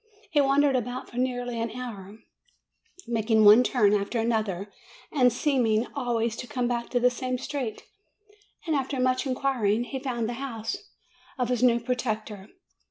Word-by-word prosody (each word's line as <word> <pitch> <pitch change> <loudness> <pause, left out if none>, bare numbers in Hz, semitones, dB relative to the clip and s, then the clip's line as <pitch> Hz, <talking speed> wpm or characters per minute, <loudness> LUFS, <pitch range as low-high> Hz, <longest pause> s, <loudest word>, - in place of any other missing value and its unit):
He 295 -3 +4
wandered 275 0 +3
about 250 +1 -3
for 240 - -10
nearly 245 -2 -1
an 230 - -1
hour, 210 -5 -8 0.9
making 220 -1 +2
one 210 +4 +9
turn 215 -6 +3
after 205 +3 0
another, 215 -4 -1 0.4
and 250 -4 +4
seeming 240 -4 +1
always 235 -4 -1
to 245 - -6
come 245 +1 -1
back 235 -1 -2
to 245 - +1
the 250 +1 +4
same 255 0 -3
street; 255 -4 -4 0.8
and 320 -3 0
after 270 -1 -1
much 255 +2 +1
inquiring, 250 -5 +1
he 265 +2 -5
found 245 -4 -2
the 240 - -3
house 235 - -4 0.6
of 250 -2 -1
his 250 -1 0
new 240 -2 +4
protector. 220 -4 -3
245 Hz, 160 wpm, -27 LUFS, 220-255 Hz, 0.9 s, one